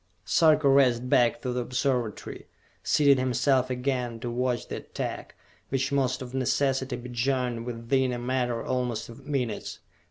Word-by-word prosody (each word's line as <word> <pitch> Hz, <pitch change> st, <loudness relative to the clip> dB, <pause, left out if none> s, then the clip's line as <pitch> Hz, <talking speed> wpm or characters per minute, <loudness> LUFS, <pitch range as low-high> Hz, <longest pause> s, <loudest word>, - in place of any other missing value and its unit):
Sarka 155 Hz, -3 st, +4 dB
raced 125 Hz, -3 st, +4 dB
back 120 Hz, +3 st, +3 dB
to 125 Hz, -2 st, -2 dB
the 125 Hz, -, -1 dB
Observatory, 125 Hz, -2 st, -2 dB, 0.3 s
seated 140 Hz, -3 st, +4 dB
himself 130 Hz, 0 st, +2 dB
again 125 Hz, -2 st, -2 dB
to 120 Hz, -1 st, -3 dB
watch 125 Hz, 0 st, -1 dB
the -, -, -5 dB
attack, -, -, -6 dB, 0.3 s
which 135 Hz, +1 st, -1 dB
must 130 Hz, -2 st, 0 dB
of 125 Hz, 0 st, -10 dB
necessity 130 Hz, 0 st, 0 dB
be 125 Hz, 0 st, -8 dB
joined 125 Hz, -1 st, -1 dB
within 125 Hz, +2 st, 0 dB
a 120 Hz, -, -2 dB
matter 120 Hz, -1 st, -1 dB
almost 125 Hz, -3 st, -2 dB
of 130 Hz, +4 st, -12 dB
minutes. 125 Hz, -7 st, -2 dB
125 Hz, 150 wpm, -27 LUFS, 120-135 Hz, 0.3 s, Sarka